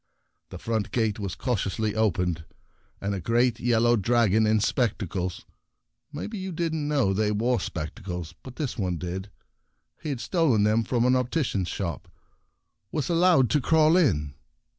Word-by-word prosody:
The -, -, -8 dB
front 110 Hz, -2 st, -2 dB
gate 110 Hz, -3 st, 0 dB
was 100 Hz, -3 st, -4 dB
cautiously 110 Hz, -3 st, -1 dB
opened, 90 Hz, -6 st, 0 dB, 0.6 s
and 100 Hz, +1 st, -2 dB
a 100 Hz, -, -2 dB
great 120 Hz, +4 st, +1 dB
yellow 120 Hz, 0 st, +3 dB
dragon 110 Hz, 0 st, +3 dB
in 110 Hz, 0 st, +3 dB
spectacles 100 Hz, -6 st, -1 dB, 0.3 s
— -, -, -53 dB, 0.3 s
maybe 190 Hz, +8 st, -5 dB
you 190 Hz, 0 st, -4 dB
didn't 160 Hz, -3 st, -2 dB
know 140 Hz, -10 st, +2 dB
they 105 Hz, +1 st, +1 dB
wore 115 Hz, +3 st, +1 dB
spectacles, 85 Hz, +1 st, -5 dB
but 130 Hz, -1 st, -11 dB
this 140 Hz, -7 st, -4 dB
one 90 Hz, -3 st, -1 dB
did; 90 Hz, +3 st, -5 dB, 0.7 s
he -, -, -4 dB
had 135 Hz, -4 st, -3 dB
stolen 135 Hz, -, +2 dB
them 110 Hz, +2 st, +3 dB
from 120 Hz, +1 st, 0 dB
an 125 Hz, -, +4 dB
opti 130 Hz, +4 st, +1 dB
cian's 95 Hz, -5 st, -2 dB
shop 85 Hz, -3 st, -4 dB, 0.4 s
— 100 Hz, -, -52 dB
was 150 Hz, -5 st, -2 dB
allowed 170 Hz, -, +4 dB
to 150 Hz, -, +3 dB
crawl 160 Hz, +3 st, +4 dB
in. 80 Hz, -, +2 dB
115 Hz, 160 wpm, -26 LUFS, 95-130 Hz, 0.7 s, an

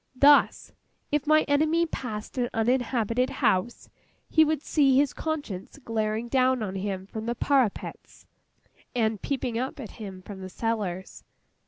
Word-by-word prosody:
Thus, 285 Hz, +2 st, +5 dB, 0.4 s
if 295 Hz, -1 st, 0 dB
my 310 Hz, 0 st, +5 dB
enemy 310 Hz, +4 st, +2 dB
passed 220 Hz, -9 st, -6 dB
an 240 Hz, -1 st, 0 dB
uninhabited 240 Hz, +1 st, +1 dB
house, 190 Hz, +6 st, 0 dB, 0.4 s
he 315 Hz, -, +5 dB
would 310 Hz, -1 st, 0 dB
see 275 Hz, -4 st, +3 dB
his 280 Hz, -1 st, +3 dB
conscience 290 Hz, -, -4 dB
glaring 225 Hz, -3 st, -2 dB
down 255 Hz, -1 st, +2 dB
on 190 Hz, -3 st, -4 dB
him 190 Hz, -1 st, -3 dB
from 220 Hz, +3 st, -6 dB
the 235 Hz, -, -1 dB
parapets, 260 Hz, -5 st, -1 dB, 0.7 s
and 220 Hz, -3 st, 0 dB
peeping 255 Hz, -4 st, -2 dB
up 260 Hz, +3 st, -4 dB
at 230 Hz, -6 st, -7 dB
him 190 Hz, -3 st, -8 dB
from 195 Hz, 0 st, -9 dB
the 185 Hz, -, -7 dB
cellars. 200 Hz, -4 st, -3 dB
240 Hz, 145 wpm, -27 LUFS, 215-280 Hz, 0.7 s, Thus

